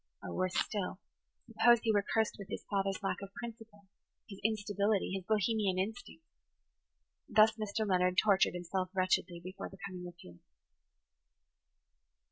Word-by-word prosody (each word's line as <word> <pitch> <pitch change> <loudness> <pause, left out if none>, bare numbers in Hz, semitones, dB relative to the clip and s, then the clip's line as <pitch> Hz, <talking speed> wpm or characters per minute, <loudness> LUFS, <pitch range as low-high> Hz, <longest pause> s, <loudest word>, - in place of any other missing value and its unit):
Or, - - -5
worse 185 0 -1
still, 200 -4 -2 0.5
suppose 235 -1 +4
he 225 - +2
were 205 - +4
cursed 220 +1 0
with 200 - -7
his - - -5
father's 195 0 0
lack 195 - 0
of 195 -1 -8
principle, 225 -3 -9 0.4
his 195 -2 -10
instability, 205 -2 +1
his 190 -1 -3
Bohemian 210 -2 +1
instincts. 235 - -4 1.0
Thus 215 -1 +6
Mr. 215 0 -2
Leonard 180 -1 +2
tortured 195 -3 +4
himself 180 +1 -2
wretchedly 185 -1 +1
before 185 +2 -7
the 195 - -13
coming 180 -2 -6
of 175 - -11
Felix. 85 -1 -14
200 Hz, 140 wpm, -33 LUFS, 185-220 Hz, 1.0 s, Thus